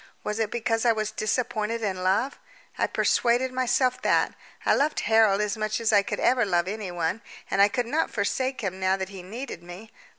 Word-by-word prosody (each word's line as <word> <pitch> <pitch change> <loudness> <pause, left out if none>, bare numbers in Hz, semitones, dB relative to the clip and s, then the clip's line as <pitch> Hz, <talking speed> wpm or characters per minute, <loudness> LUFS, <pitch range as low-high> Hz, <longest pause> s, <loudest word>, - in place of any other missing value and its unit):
Was 210 +1 -3
it 220 -2 0
because 225 -1 -1
I 240 - +5
was 215 -1 -1
disappointed 220 0 -1
in 190 -3 -2
love? 200 +9 +1 0.4
I - - +1
persuaded 245 +2 +2
myself 255 0 +1
that. - - +2 0.3
I - - +4
loved 295 +2 +1
Harold 220 -3 +4
as 210 +1 -1
much 215 0 -2
as 230 -1 +1
I 205 - +6
could - - -4
ever 250 -1 +3
love 175 -4 +1
anyone, 185 -2 -3 0.3
and 195 - +3
I 200 - +8
could 245 +2 -1
not 300 +7 0
forsake 255 +5 -1
him 190 -3 -3
now 190 0 +2
that 190 -1 -4
he 195 -2 -9
needed 220 +1 -7
me. 175 +5 -11
215 Hz, 200 wpm, -26 LUFS, 195-240 Hz, 0.4 s, I